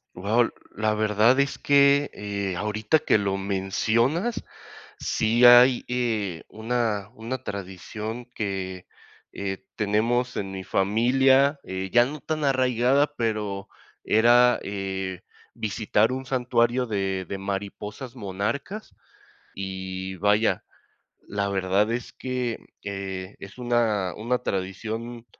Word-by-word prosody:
Wao, 110 +6 +2 0.2
la 110 0 +1
verdad 110 +4 +3
es 140 0 +1
que, 140 0 +4
eh, 100 -3 -3
ahorita 105 +7 +1
que - - +3
lo 100 -1 -1
mencionas, 110 - 0 0.6
sí 115 +3 +2
hay, 120 +1 +8
eh, 110 -8 -1
una 110 -3 -1
una 120 +2 -5
tradición 105 +4 -6
que, 95 -3 -4 0.4
eh, 95 -1 -4
tenemos 115 +4 +1
en 95 -1 -3
mi 95 -1 -6
familia, 130 +7 +3
eh, 95 0 -4
ya 120 - +7
no 150 +4 -6
tan 155 +3 -3
arraigada, 130 +1 +2
pero 105 -4 -2 0.3
era, 120 +2 +5
eh, 95 -2 -4 0.3
visitar 110 +1 +1
un 130 +1 -4
santuario 125 -1 +1
de 95 -3 -1
de 100 - -4
mariposas 100 +5 -5
monarcas 115 - -4 0.6
y, 95 -1 -5
vaya, 105 +3 +2 0.6
la 100 0 -2
verdad 100 +2 +1
es 120 0 -3
que, 125 -2 -3 0.2
eh, 95 -1 -5
es 100 0 -11
una 115 -6 +1
una 120 +3 -1
tradición 115 +4 -4
110 Hz, 115 wpm, -25 LUFS, 100-125 Hz, 0.6 s, hay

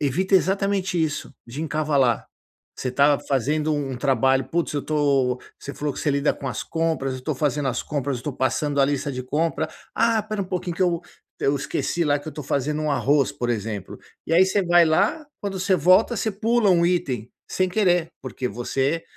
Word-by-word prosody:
evita 185 +8 +1
exatamente 190 -1 +1
isso, 155 -3 -2
de 135 +7 -6
encavalar. 145 -6 +1 0.5
Você 130 - -3
estava 140 +3 +3
fazendo 150 +4 0
um 135 -3 -2
trabalho, 135 0 +2
"putz, 170 -2 -1
eu 145 - -2
tô" 140 -5 +1 0.2
você 140 - -8
falou 145 -2 -3
que - - -6
você 150 - +1
lida 140 +1 +2
com 135 - -5
as - - -4
compras, 160 -5 -1
"eu 130 - -5
estou 145 +3 -2
fazendo 145 -1 0
as 125 -1 -1
compras, 140 -2 -2
eu - - -7
estou 145 +3 -4
passando 130 +3 0
a 135 - +6
lista 140 0 -1
de 130 0 -4
compra", 155 +4 -1 0.3
"ah, 230 -1 +3
espera 215 -1 -2
um - - -4
pouquinho 180 -2 -3
que - - +1
eu 175 -2 +1 0.4
eu 140 +1 +2
esqueci 155 +5 -1
lá 145 -1 +3
que 145 - -9
eu - - -4
estou 150 -1 -8
fazendo 145 +3 -1
um 155 - 0
arroz, 140 0 +2
por 120 0 -2
exemplo", 105 -3 -4 0.3
e - - -3
aí 175 +3 +7
você 195 +1 +1
vai 175 -1 +6
lá, 165 - +1
quando 195 -2 -4
você 190 0 +2
volta, 185 +9 +4
você 220 - 0
pula 220 +1 +2
um 170 -1 +4
item 135 -11 -1 0.2
sem 185 0 +1
querer, 180 -4 +2
porque 130 -1 -4
você 135 +6 -1
150 Hz, 205 wpm, -23 LUFS, 135-175 Hz, 0.5 s, aí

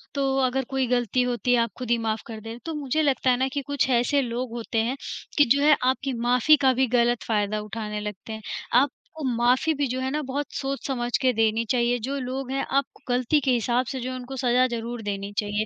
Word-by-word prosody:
तो 270 -1 +1
अगर 265 +1 0
कोई 265 -2 0
गलती 245 0 +1
होती 245 0 0
है 240 - +4
आप 230 -3 -1
खुद 250 -2 -6
ही 235 - +4
माफ़ 220 -1 -2
कर 225 - -6
देते 225 - -8
हैं 230 +1 -7
तो 325 - -3
मुझे 295 +1 0
लगता 275 -3 +2
है 245 - +4
ना 260 +1 +1
कि 285 - -1
कुछ 285 -2 0
ऐसे 250 +3 +3
लोग 245 0 -3
होते 230 -1 -4
हैं, 255 +4 -2 0.4
कि 290 - +7
जो 280 +3 +3
है 300 +1 +6
आपकी 260 +1 0
माफ़ी 250 +5 +5
का 260 -1 +5
भी 260 +1 +2
गलत 240 0 +2
फ़ायदा 210 -1 0
उठाने 210 0 -5
लगते 210 +1 -6
हैं। 220 - -7 0.3
आपको 280 +4 0
माफ़ी 250 +7 +3
भी 285 - +2
जो 255 +1 -3
है 260 - -1
ना 300 +1 -1
बहुत 285 +2 -2
सोच-समझ 270 -3 -2
के 255 - +4
देनी 225 0 +1
चाहिए 245 0 +2
जो 275 +2 -2
लोग 260 0 -4
हैं 270 0 -1
आप 275 - +3 0.2
गलती 250 +4 +2
के 265 - +3
हिसाब 245 +1 +1
से 265 -2 -4
जो 255 - -3
है - - -4
उनको 255 +1 -7
सज़ा 250 0 +3
ज़रूर 235 0 -4
देनी 200 -1 -4
चाहिए, 210 0 -1
250 Hz, 240 wpm, -25 LUFS, 230-270 Hz, 0.4 s, कि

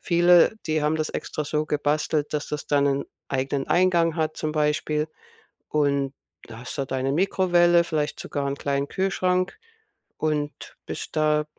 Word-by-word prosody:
viele, 175 +3 +5
die 155 0 +1
haben 150 +1 +2
das 155 -1 -1
extra 150 - -4
so 150 +1 -1
gebastelt, 150 0 0
dass 150 -1 -2
das 150 - -4
dann 145 -1 +2
'nen 140 0 +1 0.2
eigenen 135 +1 -1
Eingang 175 -2 +3
hat 155 -1 -1
zum 155 - -2
Beispiel 150 0 0 0.6
und 140 -2 +1 0.4
hast 120 +5 -7
da 140 - -1
deine 130 +1 -1
Mikrowelle, 175 -1 +4
vielleicht 155 -3 -2
sogar 140 -1 -3
'n 140 0 -2
kleinen 140 0 -1
Kühlschrank 185 -1 0 0.6
und 150 -1 -3
bist - - -6
da 150 0 +2
150 Hz, 150 wpm, -25 LUFS, 140-170 Hz, 0.6 s, viele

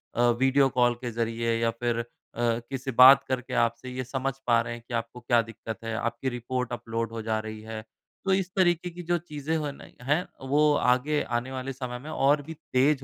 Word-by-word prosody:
अ, 120 - +1 0.2
video 135 +1 +4
call 120 -1 +3
के 120 - -3
ज़रिए 115 0 -1
या 115 - +3
फिर 120 0 -1
अ, - - -1 0.4
किसी 120 +3 -1
बात 130 +3 +9
करके 130 -1 -3
आपसे 120 +1 0
ये 130 - -2
समझ 135 +2 -2
पा 115 -1 +5
रहे 115 0 -4
हैं 120 - -9
कि 120 - -8
आपको 115 +1 -3
क्या 120 -1 +3
दिक्कत 115 0 -7
है। 115 0 -3
आपकी 120 +3 -2
रिपोर्ट 125 0 -3
अपलोड 115 -1 -3
हो 115 -1 -5
जा 110 0 -1
रही 110 0 -7
है। 110 0 -6 0.4
तो 195 - +3
इस 190 -1 +1
तरीके 175 -2 +2
की 175 +1 -9
जो 175 +1 +1
चीज़ें 155 -1 -4
हैं 150 -2 -2
न - - -13 0.2
हैं 150 +6 +1 0.2
वो 150 +1 +4
आगे 140 +4 +2 0.2
आने 130 +2 -4
वाले 130 +1 -4
समय 125 -1 -5
में 150 +4 -9
और 145 0 +3
भी 160 +3 -8
तेज़ 140 -2 +1
125 Hz, 215 wpm, -27 LUFS, 115-140 Hz, 0.4 s, बात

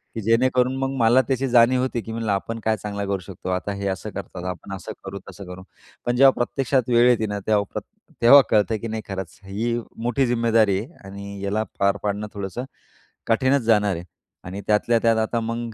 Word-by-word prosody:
की 115 - -3
जेणेकरून 125 +4 +2
मग 135 0 -1
मला 120 +3 +5
त्याची 135 0 0
जाणीव 125 +1 +5
होती, 130 -2 -1
की 115 - -8
म्हणलं 110 -2 -2
आपण 115 +4 -2
काय 110 0 +1
चांगलं 100 0 -4
करू 100 -1 -1
शकतो, 95 -1 -7
आता 95 +2 -2
हे 100 0 -4
असं 95 +2 -3
करतात, 95 -2 -7
आपण 90 +2 -6
असं 95 - -8
करू, 100 +1 -6
तसं 100 - -10
करू. 90 +1 -9 0.4
पण 120 - +1
जेव्हा 135 +2 +7
प्रत्यक्षात 130 -1 0
वेळ 120 0 +5
येते 115 -3 +2
ना, 105 0 -3
तेव्हा 105 -2 +3
प्र - - -1 0.4
तेव्हा 140 +4 +9
कळतं 110 +1 +2
की 115 - -4
नाही, 110 0 -4
खरंच 95 -3 -6
ही 115 +5 -2 0.3
मोठी 120 +3 +1
जिम्मेदारी 115 -4 +3
आहे 125 - -8
आणि 100 0 -8
याला 105 +2 0 0.2
पार 100 0 +2
पाडणं 105 +1 -2
थोडंसं 100 +5 -5 0.6
कठीणच 130 +4 +3
जाणार 105 -4 +3
आहे. 85 - -6 0.4
आणि 95 +3 -6
त्यातल्या 110 +2 +3
त्यात 115 -1 +4
आता 110 +1 0
मग 115 0 -4
110 Hz, 200 wpm, -23 LUFS, 100-120 Hz, 0.6 s, तेव्हा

